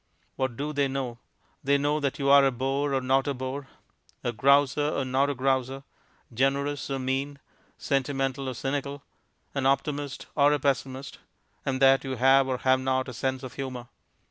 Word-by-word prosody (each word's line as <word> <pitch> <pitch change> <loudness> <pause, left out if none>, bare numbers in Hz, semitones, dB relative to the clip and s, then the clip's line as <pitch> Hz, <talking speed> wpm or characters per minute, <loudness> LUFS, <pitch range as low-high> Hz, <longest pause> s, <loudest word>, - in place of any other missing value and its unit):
What 130 -3 -2
do 150 +2 -3
they 140 -1 +1
know? 130 -3 -4 0.4
They 140 +1 +3
know 145 +2 0
that 145 -1 -2
you 140 -2 -2
are 140 0 +8
a 135 - +4
bore 135 +3 -1
or 135 - +1
not 135 +2 +1
a 140 - -1
bore, 130 +2 -5 0.6
a 120 - 0
grouser 140 +4 +3
or 140 -3 -1
not 135 +2 +1
a 145 - -2
grouser, 135 +1 0 0.5
generous 140 +4 0
or 135 - -1
mean, 135 +2 -2 0.4
sentimental 135 -1 -1
or 130 - -5
cynical, 140 +2 -3 0.5
an 135 -1 0
optimist 140 0 -1
or 145 0 +4
a 150 - +1
pessimist, 135 -1 -2 0.5
and 130 -1 0
that 135 0 +6
you 135 -1 -3
have 135 +2 +4
or 130 -1 -1
have 130 +1 +2
not 130 0 -1
a - - -7
sense 130 +2 -2
of 130 - -7
humour. 130 -3 -6
135 Hz, 180 wpm, -27 LUFS, 130-140 Hz, 0.6 s, are